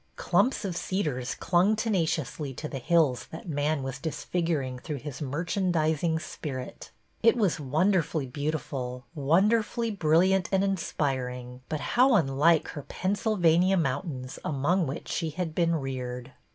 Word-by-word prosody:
Clumps 200 - +1
of 185 -3 -3
cedars 150 -10 -2
clung 185 +4 +3
tenaciously 160 - -1
to 150 - -5
the 135 - -5
hills 150 -3 +2
that 160 - -9
man 145 -2 0
was 135 0 -5
disfiguring 150 -3 -2
through 150 +3 -5
his 140 0 -7
mer 145 +5 -2
chandising 165 -3 +1
spirit. 135 -5 -7 0.3
It 230 +1 +5
was 200 -8 +1
wonderfully 155 +1 +1
beautiful, 130 -3 -4
wonderfully 210 +9 +2
bril 165 0 +4
liant 190 -2 +2
and 190 0 +3
inspiring, 130 -9 -2
but 155 -2 -2
how 255 +1 +5
unlike 155 -1 +3
her 145 - -6
Pennsyl 205 +8 -1
vania 175 +2 +4
mountains 135 -4 -2
among 155 +5 +1
which 135 +5 -5
she 165 -2 -1
had 165 +1 -3
been 170 0 +2
reared! 130 -3 -4
160 Hz, 140 wpm, -28 LUFS, 135-185 Hz, 0.3 s, It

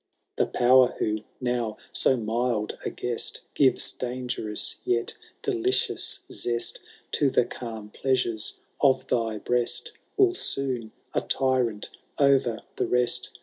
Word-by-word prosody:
The - - +2
power 125 +1 +5
who, 110 0 0 0.2
now 120 -3 -1 0.2
so 130 - +4
mild 115 -1 -1
a - - -1
guest, 120 -1 -3
Gives 135 -2 +4
dangerous 125 -4 -3
yet 115 -1 0 0.3
delidoua 380 -2 +1
zest 120 -1 -2 0.3
To 145 - +3
the 125 - +3
calm 110 -4 -7
pleasures 125 -5 0 0.2
of 130 -2 +3
thy 115 -3 0
breaft» 120 +2 0 0.3
Will 385 -2 +5
soon, 130 - -2 0.2
a - - +1
tyrant 125 -5 0 0.3
o*er 140 -1 +6 0.4
the - - 0
rest. 125 0 0
125 Hz, 120 wpm, -26 LUFS, 115-130 Hz, 0.4 s, o*er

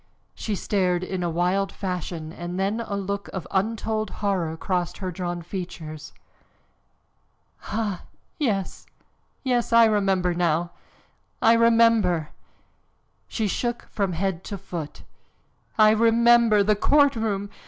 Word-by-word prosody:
She 215 - -3
stared 185 -3 0
in 185 0 -3
a 175 - 0
wild 180 +4 0
fashion 175 -4 -5
and 175 +2 -5
then 200 +4 0
a 220 -3 -4
look 200 0 -3
of 185 - -4
untold 215 +2 -1 0.2
horror 170 -5 0
crossed 180 -1 -2
her 185 -2 -4
drawn 175 -1 -4
features. 165 -4 -7 1.5
"Ah! 205 -4 -2 0.4
Yes, 205 - -2 0.6
yes, 245 -3 0
I 230 0 +7
remember 195 -4 +2
now! 170 0 0 0.7
I 225 - +5
remember!" 230 -8 +4 1.0
She 220 -2 -2
shook 240 +4 -3
from 195 -4 -1
head 185 0 -2
to 200 - -5
foot. 175 -5 -7 0.7
"I 215 -1 +7
remember! 230 -1 +5
The 210 +1 +3
courtroom! 220 -6 +2
195 Hz, 120 wpm, -24 LUFS, 180-220 Hz, 1.5 s, I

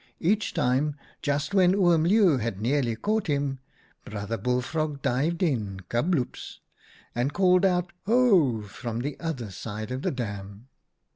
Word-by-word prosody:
Each 210 +5 +1
time, 145 0 +1 0.3
just 145 +3 -1
when 185 -1 +5
Oom 175 -5 +4
Leeuw 190 -5 +5
had 110 -4 -3
nearly 120 0 +1
caught 215 - -1
him, 140 -2 -1 0.4
Brother 105 +1 -4
Bullfrog 140 +5 -2
dived 160 +8 0
in 110 - -1
— - - -45
kabloops! 130 +2 -1 0.3
— - - -27
and 125 +4 -1
called 185 0 +4
out 180 -2 +1
'Ho!' 190 - +4
from 115 +3 -5
the 145 +2 -3
other 135 - -4
side 110 +4 -6
of 130 +1 -3
the - - 0
dam. 105 -1 -6
140 Hz, 150 wpm, -26 LUFS, 115-175 Hz, 0.4 s, when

